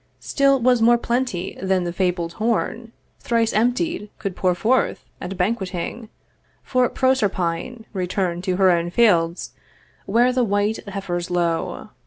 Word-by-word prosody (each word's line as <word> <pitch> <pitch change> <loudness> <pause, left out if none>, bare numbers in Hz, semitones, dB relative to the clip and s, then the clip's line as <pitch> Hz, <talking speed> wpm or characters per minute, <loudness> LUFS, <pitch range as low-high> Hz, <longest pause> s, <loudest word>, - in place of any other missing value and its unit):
Still 275 -1 +2
was 245 -1 +3
more 240 +1 +5
plenty 235 -7 -2
than 190 -1 +1
the 175 -1 -3
fabled 175 -2 -1
horn 230 0 -1 0.3
Thrice 230 -1 0
emptied 245 +3 0
could 195 -4 -4
pour 180 -1 +1
forth, 250 +8 +1 0.2
at 180 +1 -5
banqueting 195 +2 -3 0.5
For 255 -1 +1
Proserpine 220 -3 -1
return'd 180 -2 -2
to 185 - 0
her 190 0 +4
own 170 0 +1
fields, 175 -5 +2 0.6
Where 240 +5 +3
the 255 -1 +2
white 205 0 0
heifers 180 -3 -4
low. 170 -2 -1
200 Hz, 135 wpm, -22 LUFS, 180-235 Hz, 0.6 s, more